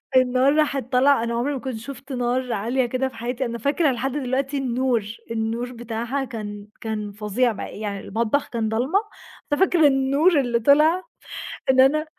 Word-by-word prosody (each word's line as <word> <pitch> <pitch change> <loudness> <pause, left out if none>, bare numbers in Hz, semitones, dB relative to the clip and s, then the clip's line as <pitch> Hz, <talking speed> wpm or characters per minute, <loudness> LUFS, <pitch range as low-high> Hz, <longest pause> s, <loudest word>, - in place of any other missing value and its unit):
النار 255 +2 +4
راحت 280 -5 0
طالعة 265 -1 +4
أنا 235 0 -2
عمري 245 +5 0
ما 270 - -3
كنت 255 0 -5
شُفت 270 +3 -9
نار 250 0 -1
عالية 240 +5 0
كده 255 +2 -1
في 260 - -10
حياتي، 245 +2 -3
أنا 235 -1 -4
فاكرة 280 +5 +1
لحد 260 +2 -2
دلوقتي 270 +1 -1
النور، 255 -3 0 0.3
النور 230 +2 -2
بتاعها 235 +3 -3
كان 205 -4 -7
كان 215 -2 -3
فظيع 210 +4 0
بقى 210 - -7
يعني 205 -2 -3
المطبخ 230 +8 -1
كان 225 -2 -1
ضلمة، 255 - +1 0.5
ففاكرة 320 0 +4
النور 280 +5 +3
اللي 240 -3 +1
طلع 305 +9 +4 0.7
إن 260 0 +4
أنا 295 +4 +5
255 Hz, 165 wpm, -23 LUFS, 230-275 Hz, 0.7 s, أنا